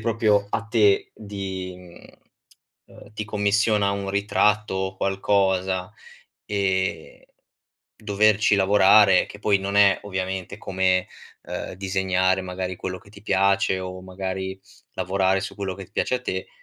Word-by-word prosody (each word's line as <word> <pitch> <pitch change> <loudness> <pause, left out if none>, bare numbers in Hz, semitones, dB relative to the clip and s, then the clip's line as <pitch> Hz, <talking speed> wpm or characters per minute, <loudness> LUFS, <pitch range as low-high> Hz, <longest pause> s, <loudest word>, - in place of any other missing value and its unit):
proprio 110 -2 +1
a 110 - -2
te 105 -3 +2
di 95 -3 -6
mhmm, 90 -1 -15 0.8
ehm, - - -16
ti 105 - -4
commissiona 105 0 +1
un 100 0 -3
ritratto 105 +1 +1
o 95 0 -3
qualcosa, 95 -1 0 0.5
ehm, 95 -5 -2 0.7
doverci 105 0 +2
lavorare, 100 0 +5
che 100 - -12
poi 105 -1 +3
non 100 +1 -3
è 100 -1 +5
ovviamente 95 -2 -4
come, 95 -1 0 0.4
ehm, - - -6
disegnare 95 0 0
magari 90 0 -5
quello 95 +1 -5
che 100 - -20
ti 100 -1 -15
piace 100 -1 +2
o 90 0 -7
magari 95 0 -5 0.3
lavorare 95 +1 +1
su 95 - -6
quello 95 -2 -4
che 95 -1 -10
piace 125 - 0
a - - -8
te, 95 -6 -4
95 Hz, 135 wpm, -23 LUFS, 95-100 Hz, 0.8 s, lavorare